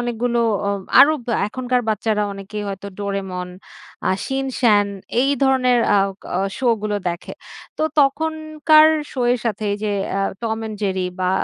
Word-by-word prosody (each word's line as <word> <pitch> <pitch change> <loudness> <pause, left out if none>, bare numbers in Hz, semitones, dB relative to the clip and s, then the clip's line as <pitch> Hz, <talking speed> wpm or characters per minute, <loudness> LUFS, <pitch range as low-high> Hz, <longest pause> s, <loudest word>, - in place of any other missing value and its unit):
অনেকগুলো 240 0 -1 0.3
ও - - +1 0.3
আরও 310 +2 +7 0.3
এখনকার 250 +2 -1
বাচ্চারা 215 0 0
অনেকেই 200 +1 -6
হয়তো 195 0 -6
'ডোরেমন,' 190 -3 -4 0.6
আ - - +3 0.5
'শিন-চ্যান', 210 -5 +4 0.3
এই 270 +2 +2
ধরনের 255 -2 +3 0.2
আওক 195 0 -1 0.2
অ - - +1 0.2
শোগুলো 215 -5 0
দেখে। 170 0 -6 0.5
তো - - 0 0.2
তখনকার 310 +2 +3 0.3
শো 260 - -4
এর 250 - 0
সাথে 215 -2 -2
এই - - -1
যে 210 - 0 0.2
এ্যা 195 - -1 0.2
'টম 225 -1 -2
অ্যান্ড 220 -1 -5
জেরি' 190 -2 -1
বা 185 0 +1
220 Hz, 145 wpm, -20 LUFS, 200-255 Hz, 0.6 s, আরও